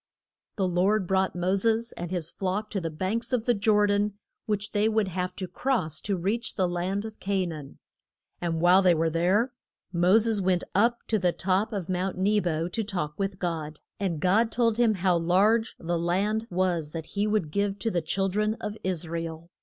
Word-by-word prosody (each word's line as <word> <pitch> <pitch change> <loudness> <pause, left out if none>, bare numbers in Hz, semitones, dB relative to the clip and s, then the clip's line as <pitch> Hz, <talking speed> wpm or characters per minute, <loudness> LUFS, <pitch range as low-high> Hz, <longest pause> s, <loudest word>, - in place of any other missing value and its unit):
The 195 -3 +1
Lord 190 +3 +2
brought 190 +1 +1
Mo 180 +1 0
ses 225 +3 +1
and 175 0 -6
his 170 -3 -3
flock 200 +3 -3
to 195 - -2
the 165 - -2
banks 190 - -2
of 240 -3 0
the 245 - +4
Jor 210 0 +3
dan, 205 0 +1 0.3
which 210 -1 -2
they 210 +1 +2
would 215 -3 +1
have 180 0 -3
to 185 - -4
cross 180 - -1
to 200 -2 -1
reach 205 +7 -1
the 185 -3 +2
land 180 +4 -2
of 220 -1 -9
Ca 195 -1 0
naan. 150 -5 -7 0.6
And 165 -2 -1
while 180 +2 +6
they 180 -3 +5
were 160 0 +1
there, 190 +9 +2 0.4
Mo 180 +4 +5
ses 225 -2 +1
went 185 -1 +1
up 235 +4 +2
to 220 - +2
the 180 -2 +2
top 190 +5 0
of 195 -6 -3
Mount 185 0 -2
Ne 205 +3 +3
bo 165 -3 -1
to 225 +5 -2
talk 175 -8 -3
with 195 -1 -2
God. 160 -4 -3 0.2
And 185 -6 -1
God 215 +7 +3
told 230 -2 +2
him 230 -3 +3
how 180 -1 +2
large 205 +7 +2
the 170 0 -2
land 205 +6 0
was 175 -4 0
that 165 -2 -5
he 205 +1 +1
would 210 -8 0
give 200 +2 0
to 225 +2 -2
the 175 - 0
chil 195 +5 0
dren 210 +3 0
of 210 -2 -5
Is 180 -3 -2
ra 165 +1 -3
el. 165 +1 -7
190 Hz, 210 wpm, -27 LUFS, 175-210 Hz, 0.6 s, while